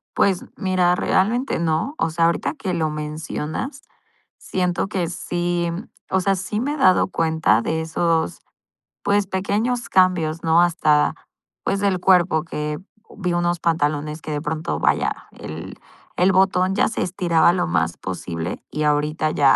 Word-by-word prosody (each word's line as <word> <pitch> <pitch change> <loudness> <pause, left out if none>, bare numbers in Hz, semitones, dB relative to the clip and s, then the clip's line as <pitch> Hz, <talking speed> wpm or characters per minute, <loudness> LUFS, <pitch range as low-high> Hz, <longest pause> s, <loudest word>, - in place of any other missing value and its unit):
Pues 190 -3 +2
mira, 185 -2 +2
realmente 230 +8 +1
no, 165 - 0
o 165 - +1
sea, 165 +1 +2
ahorita 160 -3 0
que 180 +3 -3
lo 160 -2 0
mencionas, 155 - -5 0.5
siento 180 0 -1
que 185 -5 -1
sí, 175 -1 -2 0.4
o 190 - +2
sea, 195 +1 +2
sí 200 +4 -3
me 290 +4 -1
he - - -5
dado 185 -10 +4
cuenta 160 - +2
de 160 +5 -1
esos, 160 - 0 0.6
pues, 205 -1 +2
pequeños 210 +6 -1
cambios, 175 -4 +2
¿no? 165 +1 +4
Hasta, 155 -4 +3 0.5
pues, 195 - 0
del 195 -2 +1
cuerpo 175 -4 +3
que, 150 -2 -4 0.4
vi 180 -4 -2
unos 175 0 0
pantalones 155 -1 0
que 155 - -5
de 145 -1 -2
pronto, 155 - -2
vaya, - - 0
el, 80 +2 -8 0.4
el 185 +2 +4
botón 190 0 +3
ya - - +3
se 225 - -2
estiraba 170 -2 +3
lo 180 - 0
más 85 0 0
posible 90 -1 -5
y 150 - -2
ahorita 150 +1 +1
ya 140 -3 +5
170 Hz, 155 wpm, -22 LUFS, 155-185 Hz, 0.6 s, ya